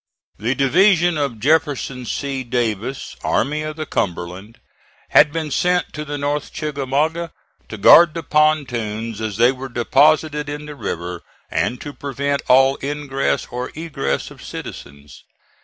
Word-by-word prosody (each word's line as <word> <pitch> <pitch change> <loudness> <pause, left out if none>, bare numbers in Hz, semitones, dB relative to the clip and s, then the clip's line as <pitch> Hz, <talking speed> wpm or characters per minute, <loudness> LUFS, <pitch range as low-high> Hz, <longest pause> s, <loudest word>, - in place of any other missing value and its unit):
The 120 +6 0
division 175 +5 +4
of 135 -6 -2
Jefferson 140 -3 0
C. 135 0 -3
Davis, 120 0 -2
Army 150 +2 0
of 155 0 -5
the 155 0 -4
Cumberland, 90 - -4 0.5
had 150 -1 +6
been 155 -1 -3
sent 180 +4 +1
to 150 - -5
the 145 -1 -5
North 145 0 -2
Chickamauga 155 +3 -1 0.4
to 110 - -6
guard 155 +10 +7
the 165 - -4
pontoons 120 -9 0
as 110 -2 -3
they 120 +2 +5
were 130 0 -7
deposited 150 +5 +2
in 150 +1 -5
the 150 - -8
river, 90 - -5 0.3
and 125 - -1
to 145 - -7
prevent 140 +1 -2
all 135 +1 +5
ingress 140 -1 -1
or 125 +1 -4
egress 145 - -3
of - - -14
citizens. 70 -1 -9
140 Hz, 140 wpm, -20 LUFS, 120-150 Hz, 0.5 s, guard